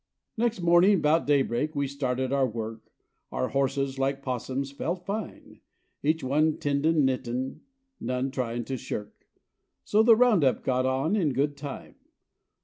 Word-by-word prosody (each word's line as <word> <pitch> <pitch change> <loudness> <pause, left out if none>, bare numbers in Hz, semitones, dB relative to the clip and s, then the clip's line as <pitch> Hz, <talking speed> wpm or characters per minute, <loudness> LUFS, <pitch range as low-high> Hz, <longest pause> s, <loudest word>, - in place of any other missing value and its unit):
Next 230 -4 0
morning 175 +3 +5
'bout 155 +1 +2
day 145 -2 +4
break 150 +6 -2
we 140 -1 0
started 130 -1 -2
our 135 -2 +3
work, 110 -1 -7 0.4
Our 130 - -1
horses, 135 0 -1
like 135 +1 -1
'possums, 130 +2 -3
felt 175 +5 -4
fine. 205 +3 -6 0.4
Each 160 +2 0
one 150 +4 +2
"tendin' 145 +1 +2
knittin'," 130 0 -2 0.4
none 125 +2 -2
tryin' 120 -3 -3
to 135 - -3
shirk! 105 -3 -7 0.6
So 210 - +3
the 225 0 +7
round 225 -8 +4
up 130 - +2
got 130 0 +1
on 135 +9 +1
in 165 -10 +1
good 145 +2 0
time. 140 -1 -8
140 Hz, 150 wpm, -27 LUFS, 130-160 Hz, 0.6 s, the